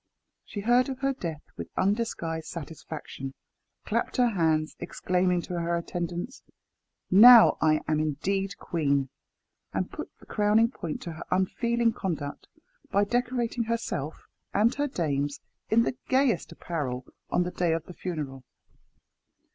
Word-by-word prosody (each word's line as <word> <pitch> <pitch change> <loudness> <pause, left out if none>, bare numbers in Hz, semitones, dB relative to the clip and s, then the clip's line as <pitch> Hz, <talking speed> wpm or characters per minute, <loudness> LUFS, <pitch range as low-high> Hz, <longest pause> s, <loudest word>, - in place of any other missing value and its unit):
She 205 - -6
heard 245 +5 +3
of 265 - -4
her 275 0 +2
death 165 - -5
with 85 -1 -6
undisguised 175 -6 -1
satisfaction, 150 -4 -7 0.5
clapped - - -1
her 245 -1 +4
hands, 160 -6 +1
exclaiming 180 -1 0
to 175 -1 -4
her 170 0 0
attendants, 175 +7 -4 0.7
"Now 230 +4 +10
I 155 -1 +4
am 155 -1 +2
indeed 195 +7 -1
queen!" 140 -5 0 0.6
and - - -2
put - - -6
the - - -18
crowning 215 +3 +3
point 165 - -5
to 170 - -5
her 160 - -7
unfeeling 230 +5 +1
conduct 155 -8 -4 0.4
by 200 - +3
decorating 240 +1 0
herself 220 -10 -3 0.3
and 220 +5 +4
her 290 +1 0
dames 145 - -1 0.3
in 230 +1 +5
the 245 - -1
gayest 260 -3 +2
apparel 130 -7 -4 0.2
on 180 - +2
the 180 - -3
day 175 -2 +1
of 165 0 -1
the 180 - -10
funeral. 150 -8 -5
180 Hz, 140 wpm, -28 LUFS, 155-230 Hz, 0.7 s, Now